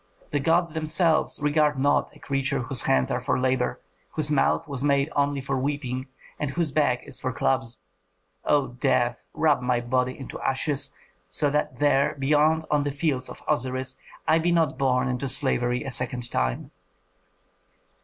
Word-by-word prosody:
The 145 - +1
gods 165 +3 +2
themselves 160 0 +1
regard 150 0 +2
not 140 +2 +1
a - - -16
creature 135 -1 -1
whose 125 0 +2
hands 65 -1 +2
are - - -1
for - - 0
labor, 130 -1 0 0.3
whose 150 -1 0
mouth 150 +3 +2
was 140 -2 -4
made 140 +1 +2
only 140 -1 +1
for 135 0 -2
weeping, 130 -2 -3 0.3
and 150 - -1
whose 160 +1 -1
back 135 -4 +1
is - - -4
for 130 - -2
clubs. 130 -2 -1 0.7
O 145 -3 +2
death, 120 0 0
rub 150 -4 +3
my 125 -1 +1
body 125 +1 -1
into 135 - -8
ashes, 135 0 -1 0.4
so 140 +11 +1
that 150 -3 -1
there, 140 0 +2
beyond 150 +3 +2
on 150 -1 +3
the 145 0 -1
fields 140 -3 -1
of - - -11
Osiris, 130 +1 -1 0.3
I 160 - +4
be 175 +2 +1
not 165 -5 +2
born 130 -1 +1
into 130 +1 -2
slavery 125 -2 +1
a 135 - -4
second 125 -1 -1
time." - - -1
135 Hz, 165 wpm, -25 LUFS, 130-150 Hz, 0.7 s, I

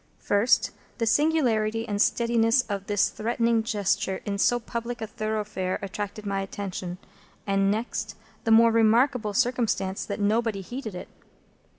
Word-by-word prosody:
First, 210 +5 +2 0.3
the 230 - 0
singularity 230 -4 +2
and 205 -1 -1
steadiness 235 +2 +3
of 200 -4 -5
this 205 -1 +2
threatening 230 +1 0
gesture 205 -4 -1
in 200 -1 -3
so 245 +4 +3
public 235 +1 -5
a 220 - -3
thoroughfare 215 -3 -3
attracted 205 +2 -5
my 195 -1 -1
attention; 190 -2 -5 0.5
and 195 0 +2
next, 220 +4 -2 0.3
the - - -1
more 230 +1 +7
remarkable 230 0 +3
circumstance 235 -6 0
that 200 - -4
nobody 215 0 +1
heeded 225 0 -6
it. - - -7
220 Hz, 135 wpm, -26 LUFS, 200-235 Hz, 0.5 s, more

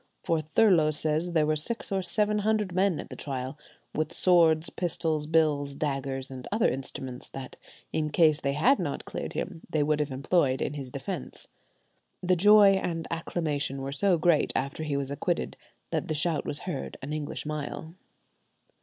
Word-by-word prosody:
For 165 -1 +1
Thurloe 160 0 +4
says 155 +3 +1
there 155 -2 +3
were 155 0 +1
six 225 +10 -3
or 195 -1 +1
seven 210 +4 +2
hundred 210 -2 0
men 185 -2 +2
at - - -8
the - - -6
trial, 130 -1 -5 0.4
with 155 +1 -1
swords, 165 -3 +4
pistols, 160 -3 -1
bills, 150 -3 +1
daggers, 135 -2 -3
and 130 -1 -8
other 215 +1 +2
instruments, 130 -1 -4
that, 135 -1 -8 0.4
in 155 -1 0
case 155 -1 +3
they 140 0 0
had 245 - +3
not - - -3
cleared - - -5
him, 165 -4 -4
they 155 -3 +1
would 150 0 +1
have 150 -1 0
employed 135 0 +1
in - - -2
his 140 -3 -6
defence. 140 +4 -6 0.7
The 185 0 +3
joy 200 +1 +6
and 165 -2 -3
acclamation 150 -5 -2
were 135 - -4
so 180 +5 +2
great 160 -1 +3
after 140 +4 -2
he 150 -3 -1
was 140 -1 -3
acquitted 140 - -2 0.4
that - - -1
the 155 - -2
shout 155 0 0
was 145 - +5
heard 165 -7 -5
an 145 +3 -4
English 155 -1 -4
mile. 155 +2 -5
155 Hz, 175 wpm, -28 LUFS, 140-175 Hz, 0.7 s, joy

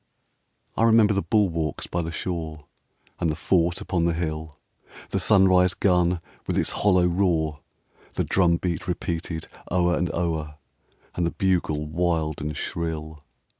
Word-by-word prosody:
I - - -1
remember 115 -2 +5
the 100 - +1
bulwarks 85 -10 0
by 85 - -2
the 85 0 -4
shore, 80 -4 -4 0.5
And 85 - +1
the 75 - -1
fort 85 +1 +1
upon 85 -3 0
the 85 -1 +1
hill; 80 -2 -4 0.5
The 95 - 0
sunrise 95 -2 +4
gun, 90 -2 +2 0.3
with - - -1
its - - +1
hollow 90 -3 +3
roar, 85 -4 +1 0.6
The - - +1
drum 85 -3 +3
beat 85 -2 -3
repeated 80 -1 -3 0.2
o'er 90 -1 +2
and 90 - -1
o'er, 80 -3 -2 0.6
And 85 - -1
the 85 - +2
bugle 85 -5 0
wild 80 -1 -1
and 75 -1 -4
shrill. 80 -2 -4
85 Hz, 145 wpm, -25 LUFS, 80-90 Hz, 0.6 s, remember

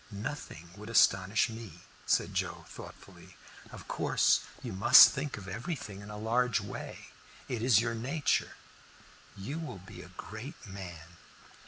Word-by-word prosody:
"Nothing 100 - -7
would 105 +2 -9
astonish 100 -2 +4
me," 110 -7 -9 0.3
said - - +2
Joe, - - -3
thoughtfully. - - -13 0.3
"Of - - -11
course - - +2 0.2
you - - -5
must 95 +5 +9
think 140 0 -4
of 100 -2 -9
everything 105 - -5
in 105 - -10
a 105 - -7
large 115 +2 +1
way 100 -1 -8 0.4
it 120 -3 -3
is 115 -3 +5
your 120 -1 -1
nature. 135 +7 0 0.8
You 135 +12 -5
will 155 -11 -6
be 90 -1 -11
a 90 - -12
great 120 - -8
man." 90 -4 -10
105 Hz, 145 wpm, -31 LUFS, 95-120 Hz, 0.8 s, must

